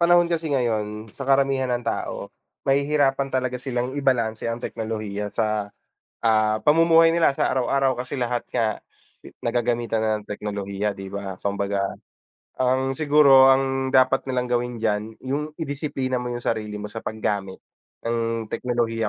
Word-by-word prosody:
panahon 175 0 +4
kasi 165 -1 -1
ngayon, 110 -5 -1
sa 135 -1 -7
karamihan 135 -1 +3
ng 120 -1 -1
tao, - - -3 0.3
mahihirapan 140 0 +2
talaga 130 -1 -2
silang 125 -1 -2
ibalanse 120 -6 0
ang 115 - -2
teknolohiya 110 -3 -4
sa, 105 -1 -1 0.5
ah, 110 -1 +3
pamumuhay 165 +1 +5
nila 165 -3 +3
sa - - +1
araw-araw. 130 0 +1
Kasi 130 +2 -5
lahat 120 0 -1
nga 110 -2 +1 0.6
nagagamitan 120 -1 0
na 110 - +1
ng 105 - -22
teknolohiya, 100 0 -3
'di 95 -1 -8
ba? 100 -1 -5
Kumbaga 100 0 -1 0.8
ang 130 +1 +2
siguro, 140 -2 +6
ang 135 0 +2
dapat 130 +1 +3
nilang 125 -1 0
gawin 120 0 -1
diyan 105 -1 +1 0.3
yung 140 +3 0 0.2
i-disiplina 140 -4 -2
mo 125 - -4
yung 120 0 -5
sarili 105 -2 -2
mo 105 0 -6
sa 115 - -5
paggamit 100 -3 -2 0.5
ng 115 -1 -1
teknolohiya. 115 -3 -1
120 Hz, 145 wpm, -24 LUFS, 110-135 Hz, 0.8 s, siguro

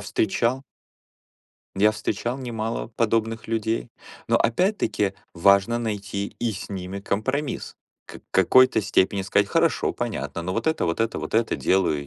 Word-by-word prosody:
встречал 115 +5 0 1.1
я 105 +2 +4
встречал 110 +3 -2
немало 115 -4 -3
подобных 115 -1 0
людей. 115 +1 -2 0.4
Но - - +4
опять-таки 115 - +1 0.2
важно 100 +6 +4
найти 100 -3 -3
и 120 -2 -1
с 95 - -7
ними 95 0 -5
компромисс. 130 +9 -2 0.3
К - - -11
какой-то 130 +5 +5
степени 95 -1 +1
сказать: 100 +1 +2
"Хорошо, - - +1
понятно, 85 - -4
но 95 - -3
вот - - -2
это, 160 - +1
вот 85 +3 -1
это, 115 0 0
вот - - -6
это- 115 0 +2
делаю 80 -7 +1
110 Hz, 140 wpm, -24 LUFS, 100-115 Hz, 1.1 s, какой-то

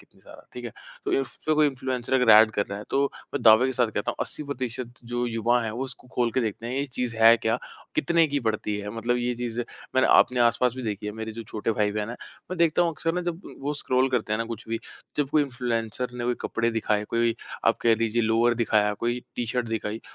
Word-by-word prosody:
कितनी - - -23
सारा, - - -15
ठीक 125 - -7
है? 120 - -5 0.3
तो - - -1
इसपे 155 +3 -2
कोई 155 0 +5
इन्फ्लुएंसर 130 -2 -2
अगर 125 -3 +5
ऐड 110 +1 +8
कर 100 - 0
रहा 100 - -5
है, 105 - -8
तो 140 - +2 0.3
मैं - - -2
दावे 110 +3 +7
के 130 - -1
साथ 120 -2 +2
कहता - - 0
हूँ - - -8
80 - - -5
प्रतिशत 130 -3 -4
जो 120 +1 -2
युवा 120 +1 +1
हैं, 110 - -2
वो 120 +5 -3
उसको 130 -1 -7
खोल 120 -1 +2
के 130 - +1
देखते 115 0 -3
हैं, 120 - -3
ये 140 +1 0
चीज़ 125 -2 -3
है 115 +1 +7
क्या? 115 +1 0 0.4
कितने 165 +2 +3
की 145 0 -1
पड़ती 110 -2 -1
है? 105 0 -5
मतलब 120 +2 0
ये 125 0 -1
चीज़ें 120 0 -3 0.3
मैंने 130 0 +4
आपने 125 -1 +5
आस-पास 120 +1 +3
भी 130 - -5
देखी 105 -2 -4
है, 105 - -3
मेरे 110 +1 -6
जो 115 +1 -7
छोटे 110 0 -3
भाई-बहन 105 0 0
हैं। 120 - -6 0.3
मैं 185 - -3
देखता 170 0 +4
हूँ 170 - +2
अक्सर 165 +1 -2
ना, 180 - 0
जब 175 +1 -4
उ - - -9
वो 145 +2 -2
स्क्रॉल 130 -2 +1
करते 120 -4 0
हैं 110 - +1
ना 115 - -1
कुछ 115 0 -7
भी 115 0 -1 0.4
जब 145 -2 +1
कोई 155 0 +4
इन्फ्लुएंसर 120 -2 -2
ने 120 - -2
कोई 125 0 +1
कपड़े 115 0 0
दिखाए, 105 -2 0
कोई 115 +1 +1 0.3
आप 115 - +4
कह 115 -1 +4
लीजिए 115 +1 0
लोअर 115 +2 +3
दिखाया, 110 -3 +2
कोई 120 +1 0 0.2
टी 120 - -1
शर्ट 125 +1 -1
दिखाई, 110 0 -3
120 Hz, 250 wpm, -26 LUFS, 110-130 Hz, 0.4 s, ऐड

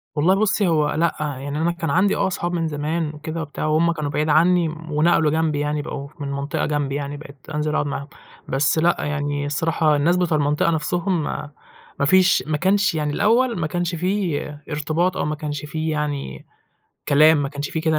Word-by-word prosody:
والله 165 +6 +3
بُصي، 210 -1 +2
هو 155 -3 +2
لأ 165 +1 +1
يعني، 145 -1 -4
أنا 170 +1 +2
كان 170 -2 -4
عندي 185 +6 +3
آه - - +1
أصحاب 175 -1 -3
من 165 -2 0
زمان 155 +1 -2
وكده 160 +2 -5
وبتاع، 150 -1 -5
وهُم 155 +2 +3
كانوا 155 -3 -3
بعيد 150 +1 0
عنّي 170 +2 +4
ونقلوا 155 0 +1
جنبي 160 -2 0
يعني، 150 0 -1
بقوا 140 -1 -6
ف 150 +2 -17
من 140 -1 -3
منطقة 140 +1 -2
جنْبي 145 -2 -1
يعني 145 0 -4
بقيت 145 -1 -12 0.2
أنزل 150 0 -1
أقعد 150 - +1
معاهم، 140 0 -4 0.4
بس 145 +4 +2
لأ 170 +2 +3
يعني 145 -1 -2
الصراحة 155 +1 +1
الناس 165 +5 +2
بتوع 170 -3 +1
المنطقة 150 +3 +1
نفسهم، 170 +2 0 0.8
ما 140 - +2
فيش 185 +3 +4
ما 155 -1 0
كانش 190 +2 +2
يعني 150 -1 -1
الأوّل 230 - +2
ما 155 - 0
كانش 175 +1 -2
في 180 -2 0 0.3
ارتباط، 160 +4 0
أو - - -1
ما 150 +1 -1
كانش 150 -1 -5
في 155 +1 -3
يعني 145 - -3 0.6
كلام، 150 +1 +5
ما 140 - -2
كانش 145 0 -5
في 160 - -2
كده 160 -1 +1
155 Hz, 195 wpm, -22 LUFS, 145-170 Hz, 0.8 s, كلام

